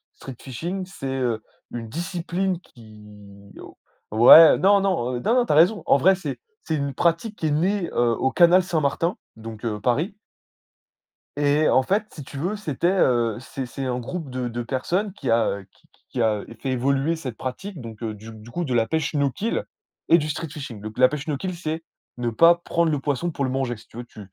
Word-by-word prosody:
Street-fishing, 140 +9 -6
c'est, 180 -7 -8
heu, 115 -4 -1 0.3
une 115 -2 -6
discipline 175 +3 -2
qui 105 - -16
oh - - -12 0.4
ouais, 120 +9 +9
non, 200 +2 +4
non, 170 -11 0
heu, - - -4
non, 220 - +1
non, 250 -1 +3
tu - - -2
as - - +3
raison. 180 +7 +4
En - - +5
vrai, 190 +8 +4
c'est 190 - -6 0.3
c'est 160 - -1
une 140 -1 -2
pratique 170 - 0
qui 160 - -2
est - - 0
née, 180 +4 0
heu, 120 -1 +2
au 130 - 0
canal 175 +5 +5
Saint-Martin, 165 0 0 0.2
donc 110 0 -9
heu, 105 -2 -2
Paris 150 - 0 1.2
et 145 +1 +3
en 130 - +4
fait, 200 +9 0
si 145 - -8
tu 140 - -10
veux, 180 +9 -2
c'était, 170 -6 -2
heu, 120 - +2
c'est 130 +1 -6
c'est 135 +2 -6
un 125 -1 -2
groupe 160 +4 -6
de 125 -1 -3
de 120 +1 -4
personnes 170 - -2
qui 140 - -3
a 110 -3 +1
qui - - -30
qui - - -31
qui 125 - -2
a 110 -2 +1 0.2
fait 135 - -4
évoluer 135 +5 +1
cette 130 -8 -7
pratique 160 +5 -6
donc 115 -1 -9
heu, 110 -1 -3
du 105 +2 -11
du 110 +1 -13
coup, 175 - -2
de 130 - -2
la 115 -1 +3
pêche 155 +2 -1
no 140 -2 +2
kill 220 - -2 0.5
et 170 - +7
du 155 0 -3
street-fishing. 145 -7 -6
Donc 110 +2 -8
la 130 - +7
pêche 150 +1 -5
no 150 - 0
kill, 185 +6 -4
c'est 160 -1 -4 0.3
ne 120 -1 -1
pas 165 +9 +6
prendre 170 -1 0
le 145 - 0
poisson 145 +5 -2
pour 140 -2 -2
le - - -1
manger. 130 -2 -2
Si - - -17
tu - - -14
veux, 120 - -5
tu 115 - -15
140 Hz, 215 wpm, -23 LUFS, 120-170 Hz, 1.2 s, ouais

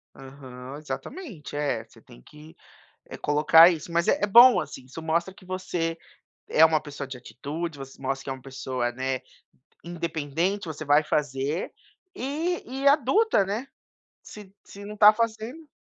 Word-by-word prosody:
Aham, 130 -1 -10
exatamente, 155 - -7
é 140 -6 -1
você - - -20
tem - - -17
que, 150 - -16 0.5
eh, - - -9
colocar 155 +3 +6
isso 170 -1 -4
mas 170 0 +1
é - - +3
é - - +6
bom 240 +5 +8
assim 130 - -7
isso 135 +5 -10
mostra 165 +3 -1
que 185 0 -18
você 180 -3 -3 0.5
é 160 - +6
uma 160 -1 +2
pessoa 145 -2 -7
de 135 - -7
atitude, 150 +6 -6
você 135 0 -11
mostra 135 0 -3
que - - -5
é - - -1
uma 130 - -11
pessoa, 130 -2 -3
né, 130 +1 -2 0.6
independente 170 +2 -2
você 155 -1 -6
vai 145 +2 +4
fazer 145 +2 -2 0.4
e 315 +7 -2
e 270 +2 -2
adulta, 290 - +4
né, 215 +7 -4 0.6
se 210 -3 -12
se 200 +1 -11
não 210 0 -8
tá 210 0 +8
fazendo 230 +7 -3
160 Hz, 165 wpm, -26 LUFS, 135-205 Hz, 0.6 s, bom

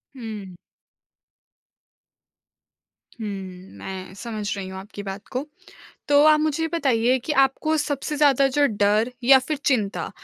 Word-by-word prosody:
हुँ। 215 -6 -8 2.6
हुँ, 220 - -4 0.5
मैं 190 -1 -7
समझ 215 -3 -4
रही 195 -1 -5
हूँ 190 - -8
आपकी 205 +1 -9
बात 195 +1 -7
को। 255 +3 -3 0.6
तो, 290 0 +6
आप 305 0 +6
मुझे 310 +1 0
बताइए 260 -6 +2
कि 305 - -1
आपको 310 +4 +1
सबसे 295 0 -2
ज़्यादा 280 -2 +4
जो 290 - +5
डर 210 +1 +1
या 265 +2 +8
फिर 285 +4 -3
चिंता, 215 -7 0
250 Hz, 130 wpm, -23 LUFS, 205-290 Hz, 2.6 s, या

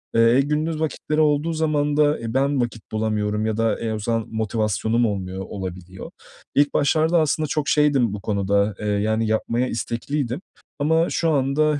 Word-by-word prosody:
Eee, 115 +3 +5
gündüz 155 +2 -1
vakitleri 155 0 -1
olduğu 150 +2 +2
zaman 150 -2 0
da, 150 0 +3
e, 115 0 -5
ben 135 0 +1
vakit 115 -2 -3
bulamıyorum 110 -1 -1
ya 110 0 -1
da, 115 -1 +1
e, 115 -1 -2
o 110 - -3
zaman 115 +1 -1
motivasyonum 110 +1 0
olmuyor, 95 -2 -3
olabiliyor. 95 -1 -7 0.4
İlk 145 0 +3
başlarda 160 +3 +3
aslında 155 +1 0
çok 150 +1 -2
şeydim 140 -8 +3
bu 100 - -6
konuda, 100 0 0
eee, 105 - -5
yani 110 +2 0
yapmaya 115 +3 0
istekliydim 125 +5 -3 0.4
ama 160 +3 +2
şu 165 - 0
anda, 145 +1 +2
120 Hz, 165 wpm, -22 LUFS, 110-150 Hz, 0.4 s, Eee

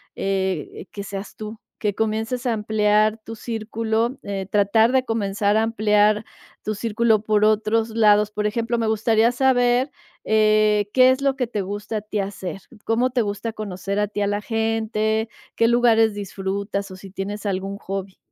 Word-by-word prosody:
eh, 190 -4 -2
que 200 - -5
seas 200 0 -7
tú. 215 0 -8 0.2
Que 205 -2 0
comiences 220 +3 -2
a 245 - +2
ampliar 215 0 +2
tu 225 0 -8
círculo, 225 +2 -2
eh, 195 -2 -4
tratar 210 +3 +4
de 260 0 +2
comenzar 205 -2 0
a 220 - +3
ampliar 215 -1 +2 0.4
tu 215 - -3
círculo 220 0 +1
por 215 -1 +2
otros 220 +1 +2
lados, 210 -1 +4
por 210 0 -1
ejemplo, 230 +2 -1
me 225 -1 0
gustaría 220 +1 +3
saber, 250 0 +2 0.4
eh, 215 -1 +3
¿qué 255 0 +6
es 260 +1 -1
lo 275 -1 +1
que 250 -2 -1
te 215 -3 -3
gusta 205 +3 -4
a - - -3
ti 210 0 -4
hacer? 195 -2 -4 0.2
¿Cómo 240 +3 +1
te 245 -1 +1
gusta 210 +2 -3
conocer 200 -2 -4
a 210 - +1
ti 205 - -5
a 205 - +1
la 205 0 -1
gente? 220 0 -1 0.3
¿Qué 230 - +3
lugares 230 -2 +4
disfrutas 200 0 -4
o 185 - -9
si 195 0 -12
tienes 200 +2 -5
algún 195 0 -2
hobby? 195 -1 -6
215 Hz, 175 wpm, -22 LUFS, 205-225 Hz, 0.4 s, qué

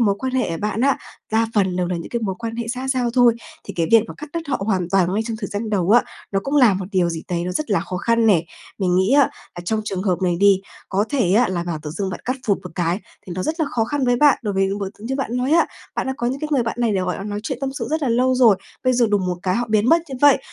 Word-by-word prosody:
mối 205 -4 +3
quan 260 -1 -3
hệ 255 -8 0
của 165 - -2
bạn 210 +2 -2
á, 275 +1 +3 0.3
đa 225 +1 +3
phần 190 -3 +2
đều 180 -1 0
là 180 - -1
những 170 - -6
cái 235 - -2
mối 190 -3 -1
quan 230 -1 -5
hệ 235 -1 -4
xã 255 +2 -3
giao 255 -3 +1
thôi, 245 -2 +5 0.3
thì - - -8
cái 165 -2 0
việc 225 -2 +7
mà - - -7
cắt 300 - -7
đứt 335 - -2
với - - -3
họ - - -6
hoàn 185 -5 0
toàn 185 -2 +2
ngay 220 - +1
trong 230 -2 -3
thời 200 - -3
gian 215 +2 -4
đầu 190 -2 +1
á, 240 - +6 0.3
nó 195 - +1
cũng 280 +2 -1
là 240 -8 +6
một 190 0 -3
điều 180 -2 +2
gì 165 -1 -4
đấy 175 -1 -1
nó 180 - -3
rất 305 -2 -3
là 200 - +3
khó 185 - -5
khăn 230 +4 +2
nè. 175 -6 +4 0.3
Mình 180 -2 +1
nghĩ 190 +7 +3
á 285 0 +7 0.3
là - - -5
trong 215 +4 0
trường 190 -3 -3
hợp 185 -2 0
này 175 -2 +1
đi, 200 -1 +5 0.3
có 200 +2 +1
thể 235 -11 +1
á 235 +2 +4
là 175 -2 -2
bảo 170 -3 -3
tự 150 - -5
dưng 190 +3 -3
bạn 180 - -6
cắt 255 +2 -1
phụp 200 - +2
một 180 - -7
cái 175 +2 0 0.3
thì 180 - -6
nó 185 - -1
rất 320 +2 -2
là 310 - +2
khó 225 -2 +1
khăn 285 +2 -1
với 245 0 +3
bạn. 290 0 +5
Đối 205 -3 -2
với 195 0 +2
những 200 +1 -2
mối 195 -1 -3
như 250 +5 -3
bạn 250 -3 -2
nói 255 +2 0
á, 335 +1 +4 0.3
bạn - - -2
đã 265 - -1
có 240 - -2
những 265 +3 -2
cái 305 - -3
người 260 -4 +3
bạn 230 - -3
này 230 -3 +2
để, 190 - +1
gọi 180 -1 -2
là, 195 - -6
nói 205 0 -4
chuyện 260 +1 -4
tâm 270 -1 -2
sự 245 -5 -4
rất 315 -1 0
là 265 - +1
lâu 255 +2 +2
rồi, 235 -6 +5 0.3
bây 255 - +4
giờ 240 -1 +3
đùng 200 -3 +1
một 180 -1 -1
cái 185 0 0
họ 240 +1 0
biến 215 +2 +2
mất 330 +2 +5
như 270 - -5
vậy, 290 -2 +6
220 Hz, 330 wpm, -21 LUFS, 185-250 Hz, 0.3 s, việc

